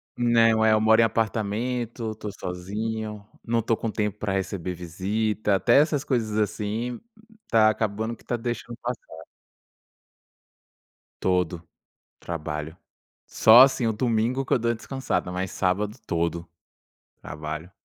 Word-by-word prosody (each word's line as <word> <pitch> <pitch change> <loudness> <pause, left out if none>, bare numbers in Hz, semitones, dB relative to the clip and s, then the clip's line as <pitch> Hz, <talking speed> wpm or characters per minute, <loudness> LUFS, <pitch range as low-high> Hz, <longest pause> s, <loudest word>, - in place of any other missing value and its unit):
Não, 115 -2 +4
é, 110 0 +5
eu 110 - +4
moro 110 +1 +5
em - - +6
apartamento, 115 +1 -1
tô 105 -1 -7
sozinho, 105 +3 -5 0.2
não 115 -1 0
tô 115 - +1
com 115 - -3
tempo 105 -1 -2
pra 105 - -2
receber 95 -2 -3
visita, 100 +5 -1
até 120 +7 +4
essas 150 -2 +2
coisas, 115 -7 -1
assim, 110 +3 -2 0.5
tá 110 -1 +5
acabando 110 +2 -2
que - - -22
tá 120 - -2
deixando 120 0 -5
passar. 115 -10 -6 2.0
Todo, 90 -2 0 0.6
trabalho. 80 -1 -5 0.5
Só, 110 +3 +7
assim, 130 -2 +5
o 110 - +1
domingo 120 +3 0
que - - 0
eu - - +3
dou 115 +1 +1
a - - 0
descansada, 120 -4 -3
mas 90 +1 -3
sábado 100 +4 -1
todo, 85 0 -1 0.7
trabalho. 75 +3 -6
110 Hz, 135 wpm, -25 LUFS, 95-115 Hz, 2.0 s, Só